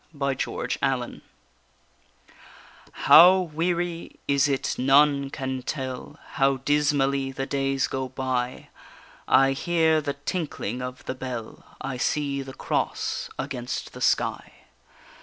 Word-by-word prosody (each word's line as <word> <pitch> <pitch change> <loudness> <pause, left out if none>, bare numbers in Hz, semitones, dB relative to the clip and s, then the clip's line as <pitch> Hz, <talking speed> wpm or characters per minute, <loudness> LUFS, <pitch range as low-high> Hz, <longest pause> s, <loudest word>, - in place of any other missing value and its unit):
_ 140 -2 -2
SPELL 135 -1 0
BOUND 120 -1 -8 1.7
How 180 +4 +8
weary 170 0 -2
is 140 +1 +3
it 135 -1 0
none 140 +1 +4
can 130 -1 -4
tell, 130 -1 -5
How 135 0 +2
dismally 140 -1 +1
the 135 0 -4
days 135 -1 0
go 130 -1 -3
by! 130 -1 -3 0.6
I 135 0 +5
hear 160 +2 +2
the 145 -1 -2
tinkling 140 - -4
of 125 0 -7
the - - -3
bell, 130 -3 -7 0.2
I 135 -1 -4
see 140 +1 -1
the 135 0 -9
cross - - -2
against 125 -1 -4
the - - -10
sky. - - 0
135 Hz, 120 wpm, -25 LUFS, 130-145 Hz, 1.7 s, How